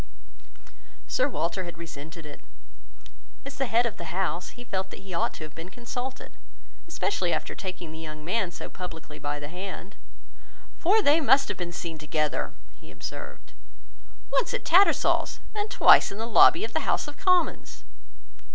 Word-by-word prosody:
Sir - - +1
Walter 180 +3 -2
had 175 -1 -8
resented 160 0 -9
it. 150 - -10 1.0
As 275 - -8
the 270 - +1
head 235 +1 +3
of 235 - -3
the 170 - -7
house, 175 +1 -2
he 245 - -8
felt 190 -5 -3
that - - -10
he 195 -1 -9
ought 170 - +1
to - - -8
have 155 -1 -9
been 165 +2 -8
consulted, 245 +4 -6 0.6
especially 400 +4 -1
after - - -2
taking 180 -4 -6
the 160 - -8
young 155 -1 -8
man 195 +1 0
so 175 - -8
publicly 165 -4 -8
by 145 0 -3
the 145 - -6
hand; 190 +3 -7 0.8
"For 410 +5 +4
they 305 +1 +5
must 275 -2 +5
have 205 - -3
been 175 -1 -3
seen 170 -2 -5
together," 155 0 -1 0.2
he - - -15
observed, - - -8 0.8
"once - - +1
at - - -4
Tattersall's, 385 +4 +4
and 420 0 -2
twice - - +7
in 200 - -7
the 225 - -3
lobby 335 - +6
of 440 - -4
the - - -1
House - - +1
of 295 - -8
Commons." 365 -1 +1
190 Hz, 170 wpm, -27 LUFS, 165-265 Hz, 1.0 s, twice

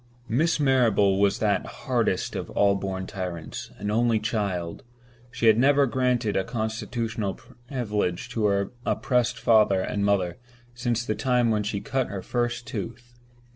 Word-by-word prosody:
Miss 155 +9 +1
Marrable 115 -8 +3
was 100 -1 +3
that - - +1 0.2
hardest - - 0
of - - -4
all 100 -1 +3
born 95 -1 -3
tyrants—an 90 +2 -5
only 115 0 +2
child. 100 -6 -2 0.5
She 120 -1 -3
had 110 0 +6
never 140 +2 +5
granted 125 -4 0
a 95 - +2
constitutional 110 -2 -3
privilege 115 -7 -3
to 110 -2 -1
her 100 -1 0
oppressed 125 -2 +1
father 105 -4 +4
and 100 +2 -2
mother 95 -3 +1 0.3
since 120 -1 -1
the 110 - 0
time 125 0 +2
when 105 -1 +1
she 105 -1 -3
cut 130 -1 -1
her 95 -1 -6
first 120 0 -2
tooth. 120 +1 -6
110 Hz, 145 wpm, -26 LUFS, 100-120 Hz, 0.5 s, had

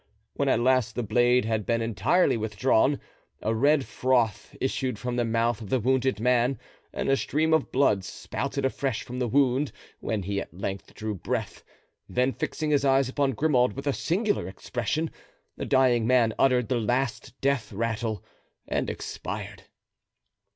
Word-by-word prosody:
When - - 0
at - - +3
last 125 -3 +2
the 120 - -1
blade 120 +3 +3
had 110 -1 0
been 115 +3 0
entirely 115 - +2
withdrawn, 110 +5 +2 0.4
a 110 - +1
red 140 +4 +3
froth 120 -5 0
issued 130 -2 -1
from 125 +3 -3
the 120 - +1
mouth 115 0 0
of 105 - -8
the 130 - +2
wounded 130 +1 +1
man 125 +2 +2 0.3
and - - -3
a 135 - +4
stream 155 +3 0
of 160 - +1
blood 105 -8 +3
spouted 100 - -4
afresh 135 -2 -1
from 125 +1 -6
the 125 - 0
wound 135 +2 +2 0.3
when 110 -3 -2
he 100 +1 -2
at - - -9
length 95 0 -5
drew 110 0 -3
breath; 95 - -4 0.5
then, 125 +1 +1
fixing 155 -1 -2
his 145 -2 +3
eyes 135 -1 +3
upon 135 0 0
Grimaud 125 -1 +2
with 135 +1 -7
a 140 - +1
singular 200 - 0
expression, 120 +10 -3 0.4
the - - -5
dying 125 -4 +3
man 120 -3 +4
uttered 125 -3 +3
the 125 - +1
last 125 +2 -2
death 140 -4 0
rattle 115 -1 -2 0.4
and - - -1
expired. - - -6
125 Hz, 165 wpm, -27 LUFS, 110-135 Hz, 0.5 s, a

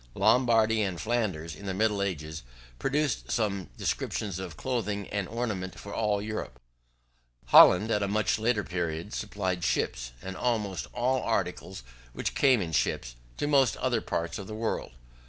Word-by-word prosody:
Lombardy 115 -3 +4
and 95 -4 -1
Flanders, 105 -9 -1
in 100 - -9
the 95 - -2
middle 105 0 +1
ages, 80 -5 -3 0.4
produced 145 0 0
some 100 -5 -1
descriptions 100 -4 -2
of 90 -5 -7
clothing 105 -5 -2
and 100 -2 -2
ornament 100 -6 -3
for 100 - -8
all 105 -2 +1
Europe: 105 - -5 0.9
Holland, 105 +5 +8
at 105 - +2
a 100 - +1
much 105 0 +1
later 110 -1 +1
period, 85 +1 -3
supplied 95 -4 -2
ships, - - -1
and 95 +5 -7
almost 105 - -1
all 125 +2 +1
articles 95 - -2 0.3
which - - -2
came 130 -7 +4
in 80 - -5
ships, - - 0 0.2
to - - -1
most 140 -4 +3
other 120 -3 0
parts 85 +3 -3
of 95 - -7
the 110 - -6
world. 110 - -2
105 Hz, 155 wpm, -28 LUFS, 90-115 Hz, 0.9 s, Holland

